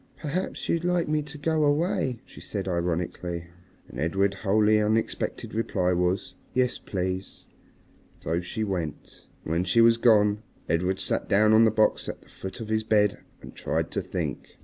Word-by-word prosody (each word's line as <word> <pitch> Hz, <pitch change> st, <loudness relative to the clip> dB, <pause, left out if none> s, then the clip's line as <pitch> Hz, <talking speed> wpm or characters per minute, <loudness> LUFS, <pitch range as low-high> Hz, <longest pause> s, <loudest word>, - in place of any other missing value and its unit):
"Perhaps 165 Hz, +5 st, -3 dB
you'd 170 Hz, 0 st, 0 dB
like 180 Hz, -1 st, +1 dB
me 150 Hz, 0 st, +1 dB
to 150 Hz, 0 st, -9 dB
go 155 Hz, +1 st, +1 dB
away," 145 Hz, -, +1 dB
she -, -, -13 dB
said 100 Hz, -2 st, -4 dB
ironically. 85 Hz, -1 st, -2 dB, 0.4 s
And -, -, -9 dB
Edred's 95 Hz, +5 st, +1 dB
wholly 105 Hz, +1 st, +3 dB
unexpected 110 Hz, +1 st, -1 dB
reply 95 Hz, -5 st, 0 dB
was, 90 Hz, +2 st, 0 dB, 0.2 s
"Yes, 125 Hz, -1 st, +1 dB
please." 95 Hz, 0 st, -4 dB, 0.8 s
So 85 Hz, +3 st, 0 dB
she 100 Hz, +5 st, -3 dB
went. 90 Hz, -7 st, -5 dB, 0.2 s
And -, -, -5 dB
when 85 Hz, +2 st, +1 dB
she 90 Hz, +5 st, +2 dB
was 115 Hz, 0 st, +6 dB
gone 105 Hz, -3 st, +4 dB, 0.3 s
Edred 90 Hz, +4 st, +1 dB
sat 100 Hz, -, -2 dB
down 105 Hz, +2 st, +5 dB
on 110 Hz, +1 st, +7 dB
the -, -, +5 dB
box 110 Hz, 0 st, +2 dB
at -, -, -7 dB
the -, -, -23 dB
foot 95 Hz, +5 st, -8 dB
of 110 Hz, -2 st, -6 dB
his 110 Hz, 0 st, +1 dB
bed 105 Hz, -2 st, +2 dB, 0.2 s
and -, -, -10 dB
tried -, -, -2 dB
to -, -, -1 dB
think. -, -, -5 dB
105 Hz, 170 wpm, -26 LUFS, 90-115 Hz, 0.8 s, on